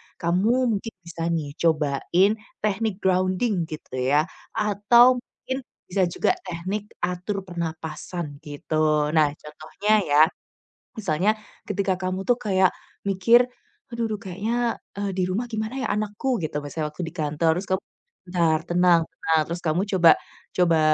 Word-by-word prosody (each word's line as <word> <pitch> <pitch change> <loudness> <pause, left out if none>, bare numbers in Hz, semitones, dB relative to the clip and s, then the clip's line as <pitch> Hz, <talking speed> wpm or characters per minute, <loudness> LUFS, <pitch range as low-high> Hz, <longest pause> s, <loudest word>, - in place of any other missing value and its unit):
kamu 215 +6 +2
mungkin 225 +2 -8
bisa 165 0 -4
nih 160 -4 -1
cobain 160 +4 +2 0.3
teknik 215 -1 -1
grounding 185 0 +1
gitu 150 -5 -7
ya, 140 +4 +3 0.3
atau 235 +5 +5
mungkin 260 +1 -6 0.2
bisa 185 0 +1
juga 170 - +1 0.2
teknik 190 +5 -4
atur 180 +3 -2
pernapasan 160 -2 -5
gitu. 150 0 0
Nah, 155 -2 +4
contohnya 155 +8 -3
ya, 145 -1 +4 0.8
misalnya 190 +1 +2 0.4
ketika 200 -2 0
kamu 185 +1 -3
tuh 245 - +5
kayak 190 -5 +3 0.4
mikir, 230 +6 +5 0.4
"Aduh 235 -1 -2
duh 210 - -2
kayaknya," 225 +6 -1 0.2
eee, 200 -1 -1
"di 185 - +2
rumah 200 +7 -2
gimana 220 +1 -3
ya - - -1
anakku?" 215 +5 -1
Gitu 150 -1 -2
misalnya 150 +1 -3
waktu 175 - -5
di - - -18
kantor, 155 +1 0
terus 190 - -4
kamu, 190 - 0 0.5
"Bentar 170 -3 +2
tenang 175 -1 +5
tenang." 160 -1 +1
Terus 170 +1 -3
kamu 160 +2 +1 0.2
coba 170 -2 +8 0.4
coba, 170 -3 +3
180 Hz, 140 wpm, -24 LUFS, 160-210 Hz, 0.8 s, coba